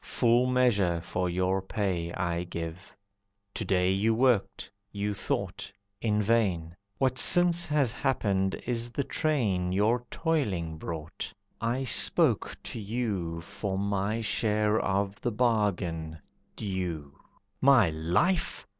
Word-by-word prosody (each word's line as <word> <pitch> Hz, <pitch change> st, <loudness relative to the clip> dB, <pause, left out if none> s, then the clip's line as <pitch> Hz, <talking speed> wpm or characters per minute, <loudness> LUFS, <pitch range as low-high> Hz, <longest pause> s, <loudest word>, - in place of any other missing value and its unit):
Full 120 Hz, +1 st, +2 dB
measure 110 Hz, -9 st, +2 dB
for 90 Hz, +2 st, -2 dB
your 95 Hz, +2 st, 0 dB
pay 95 Hz, -4 st, -2 dB
I 85 Hz, -2 st, -1 dB
give. 85 Hz, +2 st, -7 dB, 0.6 s
To -, -, -3 dB
day 90 Hz, -1 st, +2 dB
you 105 Hz, +4 st, +2 dB
worked, 120 Hz, -6 st, +1 dB, 0.2 s
you 105 Hz, 0 st, -2 dB
thought, 100 Hz, -, -3 dB, 0.3 s
in 105 Hz, -2 st, +1 dB
vain. 95 Hz, -7 st, +1 dB, 0.2 s
What 130 Hz, +1 st, +1 dB
since 175 Hz, -1 st, +5 dB
has 145 Hz, -5 st, +1 dB
happened 100 Hz, -8 st, 0 dB
is 120 Hz, -1 st, -1 dB
the 140 Hz, +4 st, -2 dB
train 105 Hz, -14 st, 0 dB
Your 110 Hz, +6 st, +2 dB
toiling 95 Hz, -, -1 dB
brought. 80 Hz, -1 st, -6 dB, 0.3 s
I 120 Hz, +4 st, 0 dB
spoke 125 Hz, -, +3 dB
to -, -, -6 dB
you 100 Hz, -7 st, -3 dB
For 95 Hz, +3 st, -4 dB
my 100 Hz, +2 st, -1 dB
share 105 Hz, -1 st, +1 dB
of 100 Hz, +1 st, -1 dB
the 120 Hz, -, -1 dB
bargain, 100 Hz, -9 st, 0 dB, 0.4 s
due." 90 Hz, -8 st, -4 dB, 0.5 s
"My 130 Hz, -10 st, +5 dB
life! 85 Hz, -, 0 dB
100 Hz, 120 wpm, -28 LUFS, 90-120 Hz, 0.6 s, since